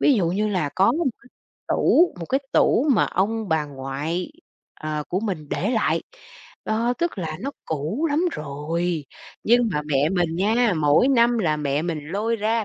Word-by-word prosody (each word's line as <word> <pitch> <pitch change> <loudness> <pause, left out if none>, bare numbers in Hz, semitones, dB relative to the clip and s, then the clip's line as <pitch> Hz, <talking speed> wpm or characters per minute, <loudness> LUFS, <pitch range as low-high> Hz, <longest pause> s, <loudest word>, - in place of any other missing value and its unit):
ví 285 - +5
dụ 195 -7 +1
như 210 +4 0
là 180 -8 0
có 190 - +4
một 330 -1 -1 0.2
cái 260 - -18 0.4
tủ, 350 +2 +3
một 165 - -5
cái 270 +2 +1
tủ 275 - +3
mà 220 - +3
ông 215 +3 -1
bà 160 -1 +1
ngoại, 145 +5 -4 0.5
ờ, 155 -1 -3
của 185 - -1
mình 180 -9 -4
để 200 - -1
lại. 225 -3 +1 0.6
Đó, 230 +3 +1
tức 340 - -1
là 155 -3 -3
nó 275 - -3
cũ 160 - -2
lắm 295 - +2
rồi, 155 +3 -3 0.4
nhưng 240 0 +4
mà 150 - -1
mẹ 145 0 +2
mình 175 -3 0
nha, 220 +2 +2
mỗi 150 - +4
năm 240 -2 +4
là 155 -7 +1
mẹ 145 0 -1
mình 170 -2 -2
lôi 220 +6 -1
ra, 220 +1 0
185 Hz, 185 wpm, -23 LUFS, 155-230 Hz, 0.6 s, ví